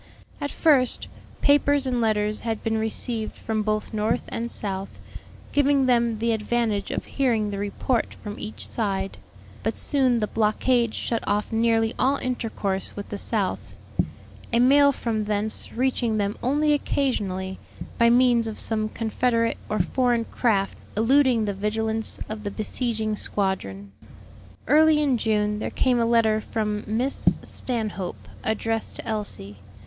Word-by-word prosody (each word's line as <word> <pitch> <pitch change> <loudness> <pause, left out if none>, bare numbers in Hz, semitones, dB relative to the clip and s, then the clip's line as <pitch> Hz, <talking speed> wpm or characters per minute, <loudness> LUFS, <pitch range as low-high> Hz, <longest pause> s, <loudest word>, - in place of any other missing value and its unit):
At 285 - -1
first, 280 -7 +3 0.3
papers 285 -1 +4
and 250 -2 0
letters 215 -1 +1
had 225 -2 -3
been 220 0 0
received 220 0 -2
from 220 -1 -2
both 215 +1 -2
North 215 +1 0
and 235 +1 -3
South, 195 -1 -3 0.6
giving 285 -1 +3
them 235 -3 +2
the 230 +2 0
advantage 220 -2 0
of - - -3
hearing 230 -6 0
the 200 - -4
report 205 +4 -1
from 205 0 -8
each 215 - -3
side; 195 - -2 0.4
but 220 - -1
soon 260 -4 +2
the 215 - +1
blockade 225 +2 +1
shut 230 -1 -1
off 210 +3 0
nearly 225 0 +2
all 270 +2 +3
intercourse 220 -7 -2
with 205 - -7
the 205 - -4
South, 205 -5 -2 0.8
a 235 - +3
mail 280 +3 +6
from 225 -5 -2
thence 210 +1 -1
reaching 245 -3 0
them 205 0 0
only 295 +4 +2
occasionally, 195 -10 -1 0.4
by 235 0 +6
means 240 -1 +4
of 220 - -5
some 215 -1 0
Confederate 230 +1 0
or 215 - 0
foreign 240 -2 +1
craft 205 -6 0 0.2
eluding 250 0 +4
the 205 - -1
vigilance 220 +2 -2
of 215 0 -6
the 205 - -2
besieging 220 +1 -2
squadron. 100 - -2 0.8
Early 310 +1 +5
in 275 -5 +2
June 210 -1 +1
there - - -2
came 250 -2 +1
a 230 - +2
letter 225 -2 +3
from 210 -1 -2
Miss 240 +6 +1
Stanhope, 215 -7 -4 0.2
addressed 225 +1 -1
to - - -7
Elsie. 205 - -3
225 Hz, 145 wpm, -25 LUFS, 210-245 Hz, 0.8 s, mail